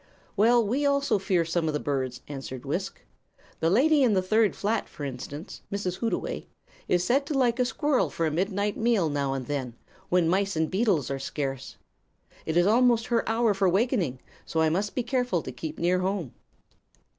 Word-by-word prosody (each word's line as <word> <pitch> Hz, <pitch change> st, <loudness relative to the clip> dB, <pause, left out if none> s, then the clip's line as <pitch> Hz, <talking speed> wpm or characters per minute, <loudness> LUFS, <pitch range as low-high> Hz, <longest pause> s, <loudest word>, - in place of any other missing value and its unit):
"Well, 230 Hz, +2 st, +4 dB
we 255 Hz, +8 st, 0 dB
also 280 Hz, -6 st, +2 dB
fear 185 Hz, -3 st, +1 dB
some 165 Hz, 0 st, -1 dB
of 155 Hz, -, -1 dB
the -, -, 0 dB
birds," 130 Hz, -4 st, -2 dB
answered 135 Hz, -3 st, -7 dB
Wisk. -, -, -4 dB, 0.6 s
"The 165 Hz, -, +2 dB
lady 285 Hz, -, +4 dB
in 245 Hz, -5 st, +4 dB
the 190 Hz, -, +3 dB
third 215 Hz, +2 st, +2 dB
flat, 215 Hz, +3 st, -1 dB
for 145 Hz, -, -9 dB
instance, 140 Hz, +5 st, -7 dB
Mrs. 195 Hz, -3 st, -2 dB
Hootaway, 230 Hz, -, -2 dB, 0.4 s
is 180 Hz, -1 st, +2 dB
said 260 Hz, +9 st, +2 dB
to 295 Hz, -, -1 dB
like 245 Hz, -2 st, +2 dB
a 250 Hz, -, +3 dB
squirrel 290 Hz, +1 st, +1 dB
for 165 Hz, -, -2 dB
a 155 Hz, -, 0 dB
midnight 200 Hz, +5 st, -1 dB
meal 225 Hz, -8 st, +2 dB
now 140 Hz, -2 st, -1 dB
and 135 Hz, -2 st, -4 dB
then, 130 Hz, -4 st, -3 dB, 0.3 s
when 180 Hz, -2 st, +3 dB
mice 195 Hz, +2 st, +1 dB
and 160 Hz, 0 st, 0 dB
beetles 190 Hz, -, +1 dB
are 135 Hz, -, -2 dB
scarce. 135 Hz, -1 st, -4 dB, 0.7 s
It 160 Hz, +1 st, 0 dB
is 175 Hz, -, +5 dB
almost 235 Hz, +1 st, +4 dB
her 230 Hz, -, +1 dB
hour 225 Hz, -1 st, +2 dB
for 195 Hz, -1 st, +2 dB
wakening, 190 Hz, -, +1 dB, 0.2 s
so 160 Hz, -, -1 dB
I 160 Hz, -, +4 dB
must 195 Hz, +6 st, -1 dB
be 250 Hz, -, 0 dB
careful 245 Hz, -, 0 dB
to -, -, -6 dB
keep 155 Hz, -1 st, -6 dB
near 180 Hz, +2 st, +2 dB
home." 185 Hz, -7 st, -2 dB
190 Hz, 190 wpm, -27 LUFS, 155-230 Hz, 0.7 s, is